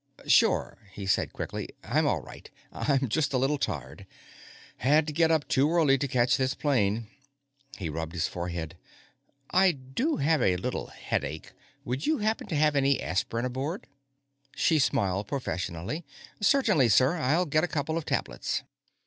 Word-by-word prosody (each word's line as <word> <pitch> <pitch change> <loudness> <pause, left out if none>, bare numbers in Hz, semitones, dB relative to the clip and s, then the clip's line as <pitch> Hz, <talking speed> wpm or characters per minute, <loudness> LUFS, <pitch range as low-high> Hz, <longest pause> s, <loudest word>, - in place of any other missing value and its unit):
"Sure," - - +3
he 100 - -6
said 95 - +1
quickly, - - -5
"I'm - - +1
all - - +1
right. - - -12 0.2
I'm 135 -2 0
just 145 +4 0
a - - +3
little 135 +3 +1
tired. - - -4 0.7
Had 150 +5 +3
to 155 - -4
get 165 +1 +3
up 160 -2 +1
too 140 +2 +3
early 150 -6 +4
to 140 - -1
catch 125 -1 +2
this 130 0 0
plane." 115 -6 +1 0.7
He 95 - -4
rubbed 80 +1 -4
his 85 - 0
forehead. 85 -1 -5 0.7
"I 185 -1 +5
do 140 - -2
have 150 0 +2
a 90 -5 +3
little 90 - -3
headache; 75 +2 -4 0.3
would 130 +4 -3
you 315 - +2
happen 215 +1 -1
to 165 - -3
have 150 0 +3
any 140 0 +3
aspirin 115 +6 -1
aboard?" 135 +8 -3 0.7
She 160 -2 +3
smiled 100 -6 +1
professionally. 95 - -4 0.4
"Certainly, 205 - +4
sir. 130 +10 +4
I'll 160 +4 +2
get 155 0 +1
a - - +2
couple 160 -1 -2
of 165 - -2
tablets." - - -2
135 Hz, 160 wpm, -28 LUFS, 105-155 Hz, 0.7 s, I